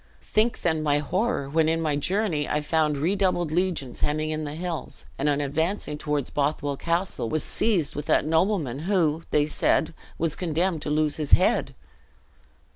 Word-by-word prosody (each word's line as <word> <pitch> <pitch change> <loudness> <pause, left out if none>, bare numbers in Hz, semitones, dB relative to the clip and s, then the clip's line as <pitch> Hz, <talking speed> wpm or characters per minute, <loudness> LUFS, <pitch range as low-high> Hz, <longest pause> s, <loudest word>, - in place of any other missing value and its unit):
Think 220 +2 +1
then 160 -2 +1
my 145 -1 +2
horror, 180 - -1
when 160 +2 +2
in 165 0 +1
my 155 -3 0
journey 170 0 0
I 150 - 0
found 150 -1 +1
redoubled 175 0 +1
legions 170 -7 -1
hemming 155 +1 0
in 155 0 -3
the 145 0 -5
hills; 170 -1 -5
and 145 +2 +1
on 145 -1 +1
advancing 150 +2 -2
toward 150 -3 -1
Bothwell 145 0 0
Castle, 170 -5 -1
was 155 -1 -1
seized 180 -10 +1
with 145 0 -5
that - - +3
nobleman, 160 - +1
who, 165 -5 +2
they 145 -1 +3
said, 155 +1 +1 0.2
was 165 -1 -1
condemned 170 -1 -1
to - - -4
lose 150 0 +1
his 150 -3 -3
head!" - - +4
155 Hz, 170 wpm, -25 LUFS, 150-175 Hz, 0.2 s, head